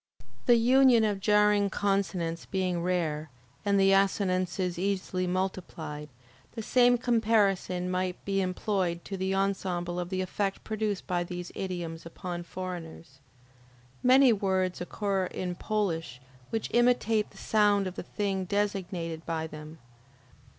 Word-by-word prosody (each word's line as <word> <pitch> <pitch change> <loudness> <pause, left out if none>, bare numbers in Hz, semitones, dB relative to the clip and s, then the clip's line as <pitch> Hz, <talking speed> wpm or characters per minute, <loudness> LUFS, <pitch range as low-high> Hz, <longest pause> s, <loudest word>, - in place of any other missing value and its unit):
The 240 - +7
union 245 0 +5
of 205 -2 0
jarring 210 0 +3
consonants 190 -4 -1
being 185 -3 -1
rare, 160 -4 -1 0.3
and 200 -1 +2
the 195 0 +5
assonances 185 -2 +1
easily 185 -1 -1
multiplied, 175 -5 -3 0.4
the 225 - -5
same 245 +1 +4
comparison 210 -6 +1
might 180 0 -2
be 195 -1 +1
employed 185 -2 -1
to 195 - -5
the 190 0 -1
ensemble 185 -3 -1
of 175 0 -4
the 185 0 -1
effect 195 +1 -2
produced 215 -2 -2
by 175 -1 0
these 175 0 -6
idioms 175 -4 -4
upon 175 +1 -6
foreigners. 170 -5 -7 0.8
Many 255 0 +6
words 190 -3 0
occur 195 +1 -1
in 180 0 -4
Polish 175 - -2 0.3
which 225 - -3
imitate 240 -3 +3
the - - -18
sound 205 -2 +3
of 185 - -4
the - - -5
thing 195 0 -2
designated 185 -5 -2
by 160 -1 -1
them. 155 0 -9
190 Hz, 130 wpm, -29 LUFS, 175-205 Hz, 0.8 s, The